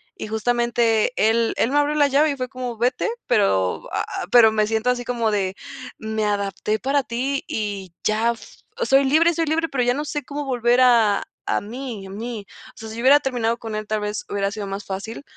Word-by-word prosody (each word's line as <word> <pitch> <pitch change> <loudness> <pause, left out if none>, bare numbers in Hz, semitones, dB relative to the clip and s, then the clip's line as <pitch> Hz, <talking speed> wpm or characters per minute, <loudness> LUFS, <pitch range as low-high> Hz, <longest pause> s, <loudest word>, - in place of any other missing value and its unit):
Y - - -6
justamente 230 0 +1
él 225 +1 +2
él 235 - +1
me 290 - +3
abrió 290 +1 +1
la 290 -1 +4
llave 285 +3 +3
y 285 - -1
fue 255 -1 -3
como: 250 -2 -6
"Vete", 250 - 0 0.2
pero 95 - +1
ah, - - -1
ah, - - -4
pero 230 -3 +7
me 215 -1 +1
siento 225 +3 +1
así 245 -1 -3
como 230 -3 0
de: 195 -2 -1 0.4
"Me 220 0 -3
adapté 205 +1 -1
para 275 +4 +1
ti 260 +4 -2
y 200 -5 -4
ya 220 +2 +2
f 230 - -15 0.2
soy 275 - +4
libre 320 +5 +4
soy 330 0 -1
libre, 325 +2 0
pero 255 -2 0
ya 245 +1 +2
no 295 +2 -3
sé 295 0 -4
cómo 290 -1 -5
volver 245 -1 +2
a 230 -5 +4 0.2
a - - +1
mí 230 -1 -7
a 190 - -10
mí". 220 +1 -6 0.3
O - - -33
sea, 220 - -8
si 220 - -8
yo - - -3
hubiera 275 +4 +6
terminado 235 -4 -1
con 225 -2 -7
él, 215 0 -4
tal 215 0 -1
vez 210 0 -3
hubiera 200 -1 -1
sido 205 -1 -5
más 195 +1 -5
fácil, 200 +7 -6
235 Hz, 225 wpm, -22 LUFS, 215-265 Hz, 0.4 s, pero